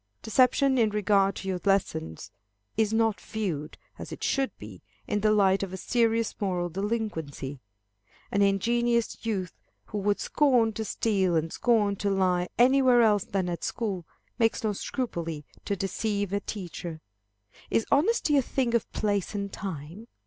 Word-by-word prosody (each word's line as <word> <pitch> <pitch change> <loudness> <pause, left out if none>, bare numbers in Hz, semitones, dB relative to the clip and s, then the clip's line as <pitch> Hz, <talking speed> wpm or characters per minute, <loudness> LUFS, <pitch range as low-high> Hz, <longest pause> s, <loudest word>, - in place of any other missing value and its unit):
Deception 260 +3 +3
in 220 -2 +4
regard 200 -2 +2
to 195 - -7
your 185 -1 -1
lessons 80 - -1 0.4
is 220 -1 +2
not 225 -1 +1
viewed, 175 -9 -4 0.2
as - - -7
it - - -7
should 270 -1 +1
be, - - -11 0.2
in 210 - -1
the 215 +1 +2
light 195 -2 +4
of 195 -2 -3
a - - -4
serious 230 +2 +1
moral 180 -3 0
delinquency. 170 - -3 0.7
An 200 - +2
ingenuous 235 +4 +1
youth, 195 -6 -2 0.3
who 210 - -4
would 205 +1 +1
scorn 245 -7 +3
to 220 - -3
steal, 195 -4 +1
and 160 0 0
scorn 210 -4 +2
to 200 - -1
lie 185 -2 +1
anywhere 255 -1 +5
else 210 -3 +3
than 190 -2 -1
at 175 -1 -4
school, 200 -7 -2 0.4
makes 225 -1 +2
no 215 -1 +1
scruple 170 - -4 0.2
to 200 - 0
deceive 200 +1 -2
a 200 - +2
teacher. 175 -5 -6 0.7
Is 225 - +1
honesty 305 -1 +3
a - - +5
thing 250 -1 -1
of 235 - 0
place 205 -1 -1
and 200 -1 -3
time? 185 +3 -7
205 Hz, 155 wpm, -27 LUFS, 185-230 Hz, 0.7 s, anywhere